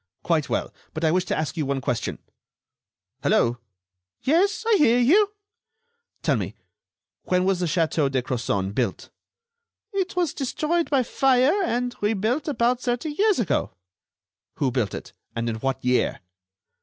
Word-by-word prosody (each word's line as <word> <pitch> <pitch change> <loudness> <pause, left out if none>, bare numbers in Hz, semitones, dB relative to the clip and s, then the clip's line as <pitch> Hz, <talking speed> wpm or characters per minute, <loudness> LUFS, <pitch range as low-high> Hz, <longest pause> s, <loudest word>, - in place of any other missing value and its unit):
"Quite 160 -4 +1
well, - - -2 0.2
but 155 - -3
I 160 - +4
wish 180 +2 +1
to - - -1
ask 155 +2 -2
you 160 - -1
one 140 -1 0
question.... 125 -3 -2 1.0
Hello!" 120 +1 +2 0.6
"Yes, 370 +10 +2
I 450 -2 +5
hear 245 -7 +5
you." 395 - +4 0.9
"Tell - - +3
me, - - -4 0.7
when 180 0 +2
was 190 -1 +2
the 180 - 0
château 160 -3 +1
de 130 -2 0
Crozon 100 -6 -1
built?" - - -2 0.8
"It 385 -1 -1
was 350 -5 +1
destroyed 310 +5 -1
by 275 -3 +3
fire 260 +2 +3
and 245 -5 -1
rebuilt 220 +8 0
about 250 -3 +1
thirty 245 +5 -1
years 410 +6 +2
ago." 165 - 0 0.8
"Who 135 -3 0
built 120 -6 -1
it, - - -8 0.2
and 115 0 -2
in 115 -1 -2
what 130 +2 -2
year?" 125 0 +1
210 Hz, 150 wpm, -24 LUFS, -, 1.0 s, I